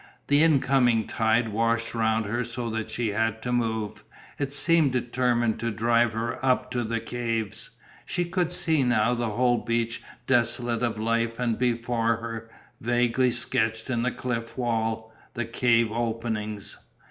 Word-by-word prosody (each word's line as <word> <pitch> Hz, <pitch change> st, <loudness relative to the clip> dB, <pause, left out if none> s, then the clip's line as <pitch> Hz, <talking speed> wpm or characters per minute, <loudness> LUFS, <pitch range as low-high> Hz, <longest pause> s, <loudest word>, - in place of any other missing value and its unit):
The 145 Hz, +1 st, +6 dB
incoming 130 Hz, -7 st, +4 dB
tide 110 Hz, +1 st, +1 dB
washed 115 Hz, +1 st, 0 dB
round 110 Hz, -1 st, +1 dB
her 120 Hz, +4 st, -1 dB
so 120 Hz, 0 st, -4 dB
that 110 Hz, 0 st, -3 dB
she 120 Hz, -2 st, -1 dB
had 110 Hz, +1 st, 0 dB
to 125 Hz, -, -2 dB
move, 110 Hz, -3 st, -1 dB, 0.4 s
it 140 Hz, -1 st, -1 dB
seemed 155 Hz, -1 st, +3 dB
determined 120 Hz, -2 st, +1 dB
to 115 Hz, -, -1 dB
drive 115 Hz, +1 st, +2 dB
her 115 Hz, +3 st, -3 dB
up 130 Hz, -1 st, +1 dB
to 120 Hz, -1 st, -1 dB
the 115 Hz, +1 st, -1 dB
caves. 115 Hz, -3 st, -3 dB, 0.3 s
She 175 Hz, -, -1 dB
could 175 Hz, -1 st, -1 dB
see 160 Hz, -4 st, +1 dB
now 120 Hz, -2 st, +2 dB
the 120 Hz, -1 st, -1 dB
whole 120 Hz, +2 st, +2 dB
beach 115 Hz, 0 st, -1 dB, 0.2 s
desolate 120 Hz, -2 st, +1 dB
of 120 Hz, -3 st, 0 dB
life 115 Hz, +1 st, 0 dB
and 120 Hz, -2 st, +1 dB
before 115 Hz, -1 st, +1 dB
her, 115 Hz, 0 st, -6 dB, 0.3 s
vaguely 120 Hz, +2 st, +2 dB
sketched 115 Hz, -1 st, -1 dB
in 120 Hz, -2 st, 0 dB
the 125 Hz, -, +1 dB
cliff 115 Hz, -2 st, -4 dB
wall, 115 Hz, -2 st, -1 dB, 0.2 s
the 120 Hz, -, -2 dB
cave 115 Hz, -1 st, +2 dB
openings. 110 Hz, -3 st, -3 dB
115 Hz, 155 wpm, -26 LUFS, 115-125 Hz, 0.4 s, The